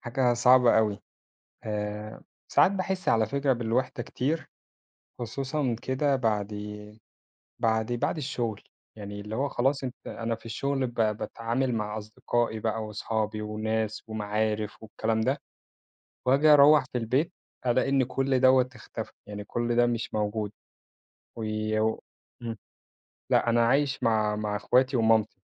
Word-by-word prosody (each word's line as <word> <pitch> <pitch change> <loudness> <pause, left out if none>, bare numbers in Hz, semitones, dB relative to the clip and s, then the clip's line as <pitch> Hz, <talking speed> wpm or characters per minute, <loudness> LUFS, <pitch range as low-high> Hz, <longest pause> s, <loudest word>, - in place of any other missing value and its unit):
حاجة 120 0 +1
صعبة 125 -1 +6
أوي، 105 -2 0 0.6
آآ، 105 0 -4 0.3
ساعات - - +5
باحس 190 -1 -1
على 110 -1 +4
فكرة 140 +4 +1
بالوحدة 120 +1 -1
كتير، 150 +8 -2 0.7
خصوصًا 130 +2 -2
كده 135 +2 +1
بعد 110 -5 0 1.1
بعد 110 +1 +1
بعد 120 +7 0
الشغل 120 -7 -3 0.3
يعني 100 -1 -7
اللي 105 +1 -6
هو 140 +3 0
خلاص 135 +2 0
أنت 125 -1 -4
أنا 115 0 -3
في 115 - -13
الشغل 135 +3 -1
ب 120 - -9
باتعامل 115 +3 0
مع 105 -1 -2
أصدقائي 110 +1 -2
بقى، 110 0 -1
وأصحابي 110 0 -2
وناس 110 0 -2
ومعارف 105 0 -2
والكلام 110 +1 -1
ده، 130 +5 0 0.8
وآجي 135 +4 +4
أروّح 145 0 +7
في - - 0
البيت، 130 +9 0 0.3
ألاقي 125 +2 +2
إن 135 -1 +3
كل 130 +1 0
دوَّة 130 0 +5
اختفى، 125 - -7 0.2
يعني 105 0 -6
كل 120 +3 -1
ده 120 0 +5
مش 120 -1 -2
موجود، 105 0 -1 0.9
و 115 - -5 1.9
لأ - - +3
أنا 115 0 +4
عايش 140 +2 +1
مع 110 -2 +2
مع 105 -1 -2
اخواتي 125 +5 +2
ومامتي، 110 -1 +2
115 Hz, 130 wpm, -28 LUFS, 110-130 Hz, 1.9 s, أروّح